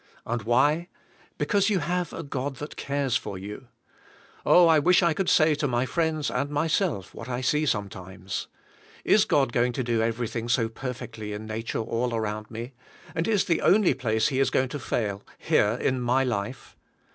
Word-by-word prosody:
And 120 0 -2
why? 145 +10 +2 0.5
Because 200 -1 +2
you 205 - +2
have 180 0 -1
a 165 - -6
God 140 -1 -4
that 150 +4 -8
cares 140 -3 -1
for 100 -5 -6
you. 105 +6 -8 0.8
Oh 175 -1 +6
I 160 -2 +5
wish 180 +4 +4
I 170 -1 +3
could 190 +3 -1
say 155 -1 +5
to 150 0 -1
my 120 0 0
friends 155 +1 -1
and 140 +3 -1
myself 150 - 0
what 115 - -9
I 125 0 -2
see 150 +4 +1
sometimes. 95 -4 -4 0.6
Is 215 0 +5
God 135 - +2
going 120 +1 +2
to 130 - -2
do 115 -2 0
everything 115 0 -2
so 115 -2 +2
perfectly 115 -3 -6
in 105 +1 -6
nature 110 +1 -3
all 115 +2 -1
around 110 -1 -3
me, 115 +3 -7 0.4
and 165 -1 -1
is 210 -4 +2
the 165 -2 +1
only 205 -1 +4
place 110 -4 0
He 130 - -1
is 135 - +3
going 130 -1 +1
to 145 - -5
fail 105 -6 -2 0.2
here 105 +2 +2
in 130 -1 0
my 125 +2 +2
life? 120 0 -4
125 Hz, 185 wpm, -26 LUFS, 115-155 Hz, 0.8 s, Oh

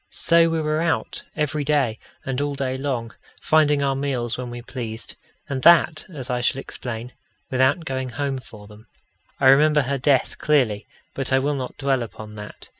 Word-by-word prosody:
So 165 0 +4
we 165 -1 0
were 155 +1 0
out 170 -1 -1
every 150 -1 -1
day 140 -6 +1 0.3
and 135 0 -2
all 145 0 -1
day 130 -2 -2
long, 130 -4 -3 0.3
finding 150 -2 +3
our 135 -1 +2
meals 130 -4 -1
when 125 -1 -5
we 120 0 -7
pleased, 115 -3 -5 0.3
and 135 -1 -3
that, 170 -1 +5
as 135 -6 -5
I 125 0 0
shall 125 - +1
explain, 120 -2 -6 0.4
without 130 +6 +2
going 130 -2 -3
home 140 +1 -2
for 105 -4 -13
them. 105 +2 -15 0.5
I - - +1
remember 150 +3 +6
her 140 +2 -2
death 135 0 +2
clearly, 125 -9 +1 0.3
but 135 -1 -3
I 130 - +5
will 140 +2 +1
not 130 -3 -5
dwell 135 -2 +1
upon 110 -1 -8
that. 105 0 -10
135 Hz, 185 wpm, -23 LUFS, 120-145 Hz, 0.5 s, remember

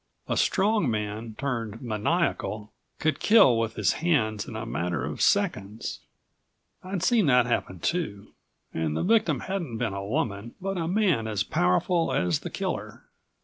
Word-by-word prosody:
A - - 0
strong 205 - +2
man, 105 +1 -3
turned 115 -6 -3
maniacal, 110 - -1 0.3
could 155 0 0
kill 200 - +6
with 115 -1 -2
his 100 -4 +2
hands 110 -11 +1
in - - -7
a 110 +1 -4
matter 85 - -2
of - - -5
seconds. 105 +3 0 0.8
I'd 185 -1 -3
seen 225 -8 +3
that 125 -2 +5
happen 105 -6 -1
too, 105 - -3 0.4
and 80 -1 -1
the - - 0
victim 220 +3 +2
hadn't 175 -12 -3
been 115 -4 -1
a 100 0 -4
woman, 110 -2 -2
but 195 +1 -3
a 165 - -1
man 180 - +2
as 105 -3 0
powerful 165 - +1
as 90 -3 +1
the - - -6
killer. - - -4
115 Hz, 155 wpm, -27 LUFS, 105-170 Hz, 0.8 s, kill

